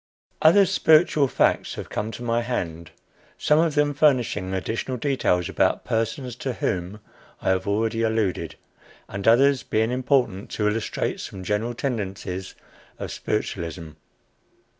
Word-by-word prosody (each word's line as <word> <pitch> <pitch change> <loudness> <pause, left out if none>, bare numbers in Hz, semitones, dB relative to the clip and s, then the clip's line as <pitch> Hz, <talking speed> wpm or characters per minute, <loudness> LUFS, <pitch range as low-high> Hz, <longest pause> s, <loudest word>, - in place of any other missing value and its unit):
Other 195 +6 +6
"spiritual" 155 -4 +4
facts - - +1
have - - -8
come 105 - -2
to 120 - -7
my 120 0 +1
hand, 85 -9 -4 0.5
some 150 +1 +3
of 160 -2 +2
them 145 0 +2
furnishing 125 -10 +2
additional 110 +7 -3
details 115 - +1
about - - +1
persons 115 +2 -2
to 130 0 -3
whom 95 -1 -3 0.4
I - - -1
have 95 +1 +1
already 110 +2 0
alluded, 110 -5 -1 0.5
and 100 +1 -5
others 135 +4 +5
being 110 +2 0
important 125 -6 0
to 105 - 0
illustrate 105 +1 -2
some 95 -1 -7
general 110 +5 -1
tendencies 95 -7 -4 0.4
of - - -6
spiritualism. 85 -6 -3
115 Hz, 135 wpm, -24 LUFS, 95-130 Hz, 0.5 s, Other